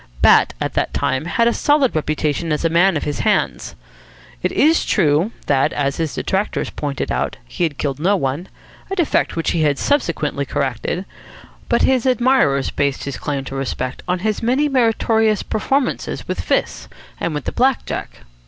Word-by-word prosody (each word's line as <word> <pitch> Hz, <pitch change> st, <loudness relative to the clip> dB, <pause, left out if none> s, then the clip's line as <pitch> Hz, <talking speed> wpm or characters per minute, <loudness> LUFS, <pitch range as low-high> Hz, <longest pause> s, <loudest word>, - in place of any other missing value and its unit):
Bat -, -, +5 dB
at -, -, -2 dB
that -, -, -1 dB
time 130 Hz, +4 st, 0 dB
had 230 Hz, +6 st, +2 dB
a 235 Hz, -, +3 dB
solid 290 Hz, -, +2 dB
reputation 155 Hz, +1 st, -1 dB
as 150 Hz, +2 st, 0 dB
a -, -, +3 dB
man 175 Hz, +1 st, +4 dB
of -, -, -3 dB
his 145 Hz, -1 st, -3 dB
hands. 65 Hz, -, 0 dB, 0.7 s
It -, -, 0 dB
is 315 Hz, +3 st, +3 dB
true 165 Hz, +3 st, +2 dB
that, 135 Hz, -2 st, +2 dB
as 140 Hz, -1 st, -1 dB
his 160 Hz, -3 st, -2 dB
detractors 195 Hz, +2 st, -1 dB
pointed 145 Hz, -2 st, -3 dB
out, -, -, -1 dB
he 170 Hz, -, -1 dB
had 150 Hz, -4 st, -4 dB
killed 140 Hz, -2 st, -2 dB
no 190 Hz, +6 st, +3 dB
one 145 Hz, +1 st, -2 dB, 0.4 s
a 390 Hz, -, -2 dB
defect 345 Hz, -6 st, +1 dB
which 165 Hz, -, 0 dB
he 165 Hz, -, 0 dB
had 145 Hz, -2 st, +2 dB
subsequently 165 Hz, -, 0 dB
corrected; 140 Hz, +7 st, -2 dB, 0.6 s
but -, -, +2 dB
his 260 Hz, -1 st, +2 dB
admirers 245 Hz, -, +2 dB
based 140 Hz, -1 st, -1 dB
his 140 Hz, -, -5 dB
claim 140 Hz, -2 st, -3 dB
to 135 Hz, -, -8 dB
respect 130 Hz, -1 st, -3 dB
on 180 Hz, 0 st, +1 dB
his 215 Hz, -1 st, 0 dB
many 255 Hz, +6 st, +2 dB
meritorious 225 Hz, -4 st, +2 dB
performances 265 Hz, +5 st, -1 dB
with -, -, -2 dB
fists -, -, -1 dB, 0.3 s
and 165 Hz, -, -2 dB
with 145 Hz, -, -4 dB
the -, -, -2 dB
black 260 Hz, +1 st, +1 dB
jack. -, -, -6 dB
170 Hz, 180 wpm, -19 LUFS, 145-235 Hz, 0.7 s, Bat